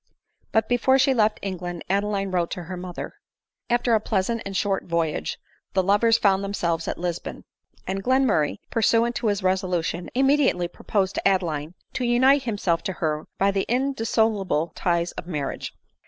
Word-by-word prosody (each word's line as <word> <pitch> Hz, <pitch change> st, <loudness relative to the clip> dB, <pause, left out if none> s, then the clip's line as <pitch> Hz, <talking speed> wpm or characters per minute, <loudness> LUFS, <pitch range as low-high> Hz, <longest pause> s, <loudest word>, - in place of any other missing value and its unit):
But 220 Hz, -1 st, +2 dB
before 245 Hz, +2 st, +3 dB
she 270 Hz, 0 st, +4 dB
left 215 Hz, -3 st, +2 dB
England 180 Hz, -3 st, -4 dB
Adeline 200 Hz, 0 st, 0 dB
wrote 175 Hz, -2 st, 0 dB
to 180 Hz, -, -6 dB
her 180 Hz, +3 st, -6 dB
mother. 180 Hz, -1 st, -6 dB, 0.6 s
After 240 Hz, 0 st, +2 dB
a 220 Hz, -, +5 dB
pleasant 215 Hz, +2 st, -1 dB
and 195 Hz, -1 st, -3 dB
short 195 Hz, -2 st, 0 dB
voyage 165 Hz, -, -1 dB, 0.4 s
the 190 Hz, -, +2 dB
lovers 210 Hz, +4 st, +4 dB
found 195 Hz, -2 st, +2 dB
themselves 170 Hz, -5 st, -1 dB
at -, -, -2 dB
Lisbon; 175 Hz, -1 st, -4 dB, 0.4 s
and 195 Hz, +1 st, -3 dB
Glenmurray, 255 Hz, -, +2 dB
pursuant 230 Hz, +1 st, +2 dB
to 235 Hz, -, -1 dB
his 205 Hz, -2 st, 0 dB
resolution, 180 Hz, -2 st, -1 dB
immediately 270 Hz, -9 st, +3 dB
proposed 195 Hz, +2 st, -1 dB
to -, -, 0 dB
Adeline 170 Hz, -4 st, 0 dB, 0.2 s
to 265 Hz, -, -2 dB
unite 260 Hz, +3 st, +4 dB
himself 200 Hz, -7 st, 0 dB
to 190 Hz, -, -1 dB
her 155 Hz, -3 st, -2 dB
by 195 Hz, +1 st, +3 dB
the 195 Hz, -1 st, -1 dB
indissoluble 225 Hz, -, +1 dB
ties 170 Hz, -1 st, 0 dB
of 170 Hz, -, -8 dB
marriage. 150 Hz, -6 st, -4 dB
195 Hz, 160 wpm, -24 LUFS, 175-230 Hz, 0.6 s, a